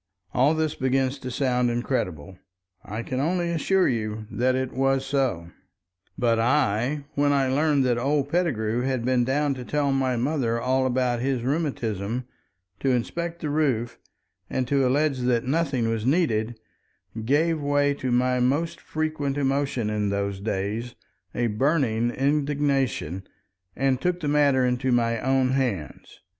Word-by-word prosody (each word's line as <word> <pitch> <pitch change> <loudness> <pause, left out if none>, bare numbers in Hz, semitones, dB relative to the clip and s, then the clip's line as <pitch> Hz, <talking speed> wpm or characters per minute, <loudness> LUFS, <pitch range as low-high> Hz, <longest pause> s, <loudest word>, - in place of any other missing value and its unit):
All 140 +5 +3
this 155 -1 0
begins 130 +1 0
to 130 - -6
sound 125 -1 +1
incredible. 95 - -3 0.4
I 110 +3 -5
can 130 +1 -3
only 170 +4 0
assure 185 +3 +2
you 110 -2 -2
that 130 +2 +1
it 130 0 -2
was 135 0 +1
so. 130 -12 -1 0.7
But 115 -2 +2
I, 130 +2 +1
when 145 0 +2
I 135 -2 +2
learned 145 -1 +2
that 120 -1 +1
old 140 +2 +1
Pettigrew 125 -9 0
had 130 -2 -1
been 125 -1 +2
down 140 +3 +1
to 130 -2 -7
tell 145 +2 0
my 130 -2 +1
mother 120 -2 0
all 130 +2 +1
about 125 -1 0
his 130 -1 -1
rheumatism, 125 - -2 0.5
to 135 - 0
inspect 170 +7 -2
the 150 - -2
roof, 130 -7 0 0.5
and 130 -1 -1
to 135 -2 +3
allege 140 +1 +1
that 125 -2 +1
nothing 135 -4 0
was 115 -1 -1
needed, 120 -6 +1 0.6
gave 155 +6 +2
way 145 0 +2
to 130 -3 -3
my 125 +1 +2
most 145 +7 0
frequent 155 -3 -2
emotion 135 -5 0
in 105 -1 0
those 100 -1 -2
days, 105 +3 -3 0.4
a 120 - +1
burning 120 0 +1
indignation, 140 - 0 0.5
and 135 -1 +1
took 180 0 0
the 155 - -3
matter 145 -3 +3
into 125 +1 0
my 115 -1 +2
own 130 0 +2
hands. 125 - -3
130 Hz, 150 wpm, -25 LUFS, 120-145 Hz, 0.7 s, All